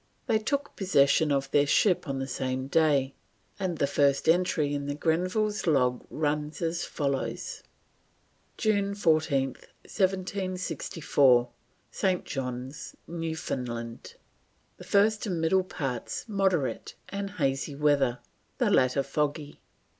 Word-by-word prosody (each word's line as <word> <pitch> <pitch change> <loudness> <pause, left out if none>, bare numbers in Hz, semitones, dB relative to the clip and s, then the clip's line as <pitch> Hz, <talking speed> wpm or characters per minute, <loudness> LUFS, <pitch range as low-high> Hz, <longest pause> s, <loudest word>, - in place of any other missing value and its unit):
They 220 - +2
took 280 +6 -2
possession 150 -5 +3
of 140 -1 0
their 145 0 +4
ship 180 +3 +3
on 135 - -2
the 135 - -2
same 130 0 -3
day, 140 -2 +2 0.5
and 185 -4 -2
the - - +2
first 140 0 +2
entry 165 -4 +2
in 140 0 -3
the 145 - -2
Grenville's 185 +7 0
log 125 -5 +2
runs 150 0 -2
as 170 0 -1
follows: 140 -3 -3 1.0
"June 200 -3 +1
14th, 155 -7 +1 0.2
1764, 180 - +1 0.4
St. 185 +4 0
John's, 130 0 -5
Newfoundland. 125 -8 -5 0.6
The - - -11
first 210 +2 +2
and 180 -4 -1
middle 185 +4 +3
parts 135 -9 -4
moderate 190 - 0
and 200 0 -4
hazy 135 -1 -1
Weather, 140 -4 +2 0.4
the - - +2
Later 130 +1 +3
foggy. 150 0 -2
150 Hz, 115 wpm, -28 LUFS, 135-185 Hz, 1.0 s, their